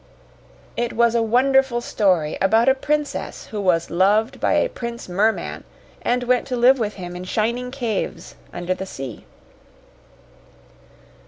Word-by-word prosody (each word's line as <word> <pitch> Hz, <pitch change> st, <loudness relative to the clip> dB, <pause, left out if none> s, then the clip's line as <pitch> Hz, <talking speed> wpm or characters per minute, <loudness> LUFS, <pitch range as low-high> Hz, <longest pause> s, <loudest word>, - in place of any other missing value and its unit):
It 240 Hz, 0 st, -2 dB
was 235 Hz, 0 st, +3 dB
a 235 Hz, -, +2 dB
wonderful 255 Hz, +2 st, +3 dB
story 185 Hz, -10 st, +1 dB
about 220 Hz, +5 st, +3 dB
a 265 Hz, -, +7 dB
princess 295 Hz, +2 st, -3 dB
who 210 Hz, -2 st, -3 dB
was 175 Hz, -3 st, +1 dB
loved 210 Hz, +8 st, +2 dB
by -, -, +1 dB
a -, -, +3 dB
Prince 235 Hz, -, -7 dB
Merman, 205 Hz, +5 st, 0 dB, 0.4 s
and 245 Hz, +1 st, 0 dB
went 250 Hz, 0 st, +1 dB
to 255 Hz, -, -2 dB
live 250 Hz, +2 st, +5 dB
with 210 Hz, -2 st, -2 dB
him 180 Hz, -2 st, -7 dB
in 180 Hz, -, -6 dB
shining 235 Hz, +6 st, -1 dB
caves 240 Hz, -6 st, -4 dB, 0.2 s
under 175 Hz, +1 st, -2 dB
the 190 Hz, +1 st, -6 dB
sea. 135 Hz, -, -8 dB
230 Hz, 145 wpm, -22 LUFS, 190-250 Hz, 0.4 s, a